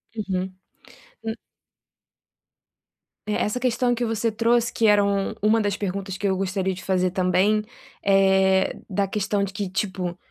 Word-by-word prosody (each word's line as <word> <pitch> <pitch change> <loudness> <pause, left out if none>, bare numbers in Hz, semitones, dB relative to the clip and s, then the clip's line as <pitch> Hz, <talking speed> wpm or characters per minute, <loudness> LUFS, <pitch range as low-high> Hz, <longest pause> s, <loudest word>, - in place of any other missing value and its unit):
Uhum, 190 -3 -3 0.7
um 225 - -2 1.9
É, 210 - -2
essa 210 +3 0
questão 245 0 +1
que 240 0 -1
você 225 0 0
trouxe, 235 +1 +2
que 225 - +2
eram 200 -1 +2
uma 215 +2 +4
das 205 -2 0
perguntas 195 -1 -4
que 205 - -1
eu 190 -1 +1
gostaria 190 0 -1
de 185 - -9
fazer 185 -1 +1
também, 190 +3 +2 0.4
eh, 190 -1 +4 0.2
da 195 0 0
questão 205 0 -1
de 200 - -3
que 205 -2 -3
tipo, 185 -2 -3
200 Hz, 145 wpm, -24 LUFS, 190-215 Hz, 1.9 s, uma